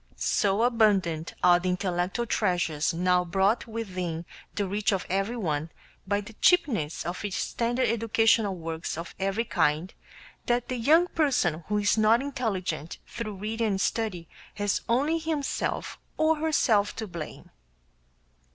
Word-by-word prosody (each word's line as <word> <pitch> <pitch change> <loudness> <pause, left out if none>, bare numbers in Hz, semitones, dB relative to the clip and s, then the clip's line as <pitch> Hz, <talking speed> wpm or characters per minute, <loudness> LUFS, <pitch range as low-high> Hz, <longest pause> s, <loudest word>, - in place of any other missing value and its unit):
So 200 +2 +1
abundant 200 -9 +2
are 175 -1 +6
the 185 +1 -2
intellectual 180 +4 -1
treasures 175 -9 0
now 180 +1 +2
brought 195 +7 +1
within 185 -7 -4 0.3
the 205 - 0
reach 205 +3 0
of 195 -2 -1
everyone 190 -7 -1 0.4
by 205 +1 +1
the 215 +3 -11
cheapness 240 - +2
of 175 +3 -4
standard 240 +6 0
educational 225 -2 +2
works 165 -2 -5
of 165 +1 -6
every 195 +4 0
kind, 155 -1 0 0.5
that 240 0 0
the 255 - -2
young 310 +9 +5
person 185 - +1
who 210 - 0
is 205 +1 +2
not 220 +2 +5
intelligent 195 - -3
through 215 -3 -6
reading 220 +3 -2
and 195 -2 0
study 200 -8 -1 0.3
has 205 -1 0
only 290 +8 +2
himself 315 -3 -2 0.2
or 315 0 +3
herself 245 -10 +2
to 225 - -4
blame. 170 -5 -8
205 Hz, 135 wpm, -27 LUFS, 180-230 Hz, 0.5 s, are